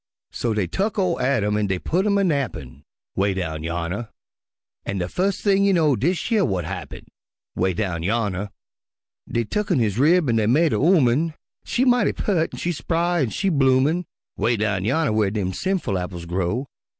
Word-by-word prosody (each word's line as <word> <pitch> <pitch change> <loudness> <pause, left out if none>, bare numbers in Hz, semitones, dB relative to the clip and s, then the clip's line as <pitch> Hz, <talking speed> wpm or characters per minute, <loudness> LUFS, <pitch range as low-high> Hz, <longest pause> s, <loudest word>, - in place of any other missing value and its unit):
So 115 -3 -2
dey 105 -3 +1
tuck 200 - -2
ol' 185 -4 0
Adam 105 -6 +1
an' 105 -1 0
dey 95 -1 0
putt 180 - 0
him 200 -1 +3
a 200 - +2
nappin', 100 - -2 0.3
('Way 100 0 +1
down 80 -4 -3
yonner) 85 +7 -3 0.7
An' 100 - -3
de 90 -1 -2
fus' 190 - -1
thing 200 -1 +3
you 200 0 +4
know 155 -6 +3
dish 170 - -1
yer 225 - +4
w'at 95 - 0
happen, - - -7 0.5
('Way 95 0 0
down 90 -4 -2
yonner) 100 0 -1 0.8
Dey 120 - 0
tucken 200 - -1
his 110 -2 0
rib 165 +3 +4
an' 115 -2 +2
dey 110 -1 +2
made 155 +7 +3
a - - +2
'ooman, 155 -1 +3 0.3
She 255 - 0
mighty 245 -4 +3
peart 170 -6 0
an' - - -8
she 175 - -1
spry 170 +2 0
an' 130 - +1
she 195 - -1
bloomin', 140 +3 +2 0.3
'Way 120 0 +1
down 105 -3 -1
yonner 140 +2 +1
whar 105 -2 +2
dem 95 -3 -2
sinful 185 - -1
apples 90 -1 -6
grow. 95 +9 -1
120 Hz, 185 wpm, -23 LUFS, -, 0.8 s, you